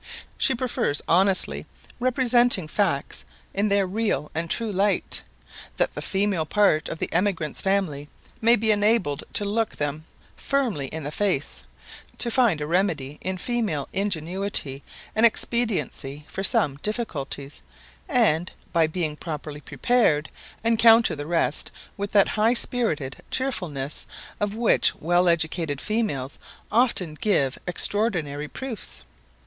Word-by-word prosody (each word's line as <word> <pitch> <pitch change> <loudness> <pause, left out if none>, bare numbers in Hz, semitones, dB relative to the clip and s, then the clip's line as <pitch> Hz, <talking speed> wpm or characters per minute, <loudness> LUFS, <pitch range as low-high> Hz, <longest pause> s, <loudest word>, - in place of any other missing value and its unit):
She 265 - +2
prefers 235 - -1
honestly 185 +2 +2 0.3
representing 245 - +3
facts 170 -5 -1 0.3
in 205 +2 +1
their 200 -1 +3
real 200 -5 -1
and 165 +1 -3
true 225 +3 -1
light, 200 +1 +1 0.6
that - - +1
the - - -5
female 195 -5 0
part 200 -7 +2
of 165 - -4
the - - -4
emigrant's 175 -5 0
family 180 -8 -1 0.3
may 230 +2 +6
be 220 -1 +2
enabled 205 -8 +2
to 205 - +2
look 220 +2 -1
them 150 +1 -3 0.3
firmly 240 - -1
in 160 +3 -6
the 145 - -4
face; 185 -7 -1 0.5
to 235 - -1
find 230 - +3
a - - -1
remedy 155 -5 -1
in 185 0 -3
female 205 - -1
ingenuity 185 -6 -1 0.3
and 220 - +3
expediency 220 - 0
for 195 - -5
some 140 -7 +3
difficulties; 145 - -4 0.5
and, 210 - +2 0.2
by 165 -2 +4
being 155 -2 -2
properly 150 -2 -6
prepared, 155 - +1 0.3
encounter 230 -2 +5
the 145 0 -6
rest 165 -2 0 0.3
with 200 0 -4
that 200 -2 +5
high 225 +3 +2
spirited 160 - -2
cheerfulness 160 - -3 0.3
of 205 0 -1
which 230 0 +3
well 175 +3 +2
educated 160 -3 0
females 180 - -2 0.3
often 215 -8 +2
give 150 -6 0
extraordinary 175 -6 +1
proofs. 215 - -6
190 Hz, 130 wpm, -24 LUFS, 150-220 Hz, 0.6 s, may